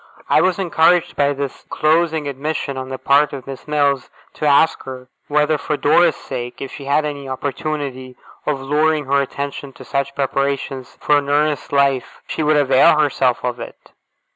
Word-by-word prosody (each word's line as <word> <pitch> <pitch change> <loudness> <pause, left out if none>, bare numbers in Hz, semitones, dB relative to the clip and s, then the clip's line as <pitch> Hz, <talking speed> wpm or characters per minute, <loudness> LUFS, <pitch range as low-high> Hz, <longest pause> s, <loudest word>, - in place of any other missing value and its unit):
I - - +4
was 185 -1 +2
encouraged 175 -2 +2
by 145 0 +2
this 140 -1 -5
closing 160 -1 +1
admission 140 0 -3
on 130 0 -5
the 130 - -4
part 145 +3 +3
of 135 -2 -7
Miss 135 0 -9
Mills 145 -3 +1 0.2
to 150 - -2
ask 145 +3 +4
her, 130 -1 -8 0.2
whether, 150 +1 +2
for 150 +1 -2
Dora's 160 +2 +4
sake, 120 -2 -6
if 135 - -6
she 140 - -9
had 145 +2 +2
any 140 -2 -5
opportunity 135 -2 -4 0.3
of 145 -2 0
luring 150 +2 +1
her 140 +1 +2
attention 140 0 -5
to 130 - -13
such 140 +2 -2
preparations 135 -1 -2
for 150 - +3
an 140 -1 -6
earnest 150 +1 0
life, 140 -2 +1
she - - -4
would 150 0 +3
avail 135 +1 +5
herself 135 -4 +1
of 125 0 -2
it? - - -10
140 Hz, 175 wpm, -19 LUFS, 135-150 Hz, 0.3 s, avail